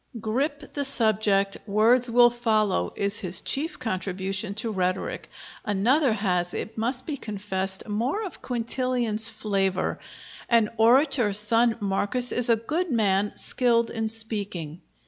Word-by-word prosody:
"Grip 280 +7 -3
the 285 - -2
subject: 215 -6 +2
words 230 +4 +3
will 240 0 +5
follow," 215 - 0
is 200 +2 +2
his 180 -4 +1
chief 305 +5 0
contribution 195 -2 -3
to 220 +1 -3
rhetoric. 185 -2 -3 0.3
Another 235 +8 +2
has, 180 -4 -1
it 220 - -5
must 245 +3 -1
be 300 -3 -4
confessed, 195 -3 -2
more 240 - -2
of 375 - -9
Quintilian's 235 -2 0
flavor: 195 -4 -2 0.5
"An 230 -3 +3
orator, 240 -1 +3
son 225 +3 +2
Marcus, 205 +5 0
is 245 -1 0
a 230 - +5
good 310 +11 -3
man 205 -4 +1
skilled 235 -2 +1
in 225 -1 -3
speaking." 205 -8 -1
220 Hz, 130 wpm, -25 LUFS, 200-245 Hz, 0.5 s, will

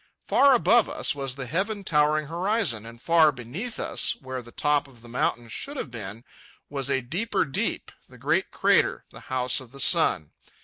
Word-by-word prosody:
Far 275 -1 +5
above 225 +3 +4
us - - -1
was 135 -3 -4
the 135 -2 -5
heaven 200 - -2
towering 150 -2 +2
horizon, 170 - -1
and 115 0 -12
far 160 +2 +4
beneath 140 - -6
us, - - +1
where 130 -1 -6
the 120 0 -14
top 145 +1 +1
of 120 -4 -18
the - - -12
mountain 120 0 -1
should 280 - -5
have 125 - -5
been, 110 -1 -7 0.5
was 140 -2 -2
a 135 -1 +1
deeper 175 - -1
deep, 135 - -2 0.2
the - - -15
great - - 0
crater, - - +2
the - - -11
House 125 -1 +1
of 130 -3 -13
the 140 - -11
Sun. 135 - +3
140 Hz, 185 wpm, -25 LUFS, 120-170 Hz, 0.5 s, Far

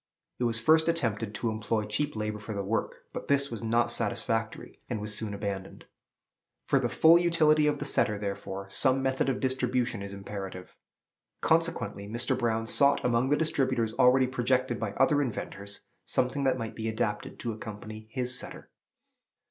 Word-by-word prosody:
It 125 - +1
was 115 -1 +1
first 160 +7 +4
attempted 115 -9 -1
to 110 +3 -1
employ 110 0 -1
cheap 145 +8 -1
labor 105 0 -3
for 105 +1 -6
the 100 - -2
work; 110 +4 -2
but - - -6
this 140 -1 +2
was 115 - -5
not 115 +1 +2
satisfactory, 115 0 -1
and 115 -4 -2
was 105 0 -5
soon 110 -1 -2
abandoned. 100 -2 -5 0.8
For - - +3
the - - 0
full 165 +2 +6
utility 155 -3 +4
of 145 -1 +1
the - - -5
setter, 105 - +2
therefore, 100 -1 -5
some 135 +3 +2
method 135 0 +1
of 130 - -1
distribution 125 -4 0
is 100 0 -6
imperative. 95 -2 -7 0.7
Consequently 125 -12 0
Mr. 120 +4 -1
Brown 115 -2 0
sought 140 +4 +3
among 125 +1 +2
the 145 - +3
distributers 130 -8 0
already 125 +2 +5
projected 125 -1 0
by 110 -3 -3
other 145 +2 +3
inventors 100 -5 -5 0.3
something 135 +2 +1
that 130 -1 +2
might 115 -2 -4
be 110 0 -3
adapted 105 -1 -2
to 120 - -3
accompany 110 0 -8
his 125 +1 -2
setter. - - -6
115 Hz, 170 wpm, -29 LUFS, 105-130 Hz, 0.8 s, full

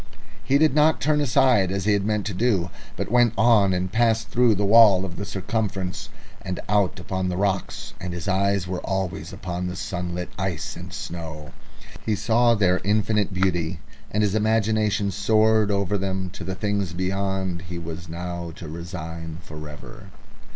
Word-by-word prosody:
He 135 +1 +3
did 155 -1 +4
not 155 +2 +4
turn 150 -1 +2
aside 130 -8 +3
as 100 0 -2
he 105 - +4
had 100 -1 +1
meant 105 -1 0
to 105 - -3
do, 95 -4 +1 0.3
but - - -3
went 120 -2 +4
on, 110 -4 +5
and 90 0 -1
passed 110 0 +2
through 120 -2 +4
the 100 +1 0
wall 100 -3 +7
of 90 -2 -7
the 100 - -4
circumference 95 -2 -3 0.3
and 95 -1 -4
out 100 -4 +1
upon 95 +1 -2
the 90 - -2
rocks, 95 -1 -2
and 90 - -4
his 85 0 -5
eyes 100 -1 +1
were 90 0 -3
always 95 -4 -3
upon 90 -2 -4
the 90 - -4
sunlit 90 -1 -4
ice 95 -5 -3
and - - -9
snow. 80 -3 -7 0.5
He 110 - 0
saw 115 +3 +3
their 95 -3 +2
infinite 105 0 +1
beauty, 90 -3 0 0.3
and 105 +1 0
his 100 -2 +1
imagination 110 -2 +1
soared 110 +2 +3
over 100 0 0
them 95 -1 -2
to - - -8
the 95 - -4
things 100 -3 -1
beyond 95 0 -2
he 90 - -5
was 85 +1 -7
now 85 0 -5
to 85 - -9
resign 80 0 -6
for 75 0 -9
ever. 100 +8 -11
95 Hz, 175 wpm, -24 LUFS, 90-105 Hz, 0.5 s, wall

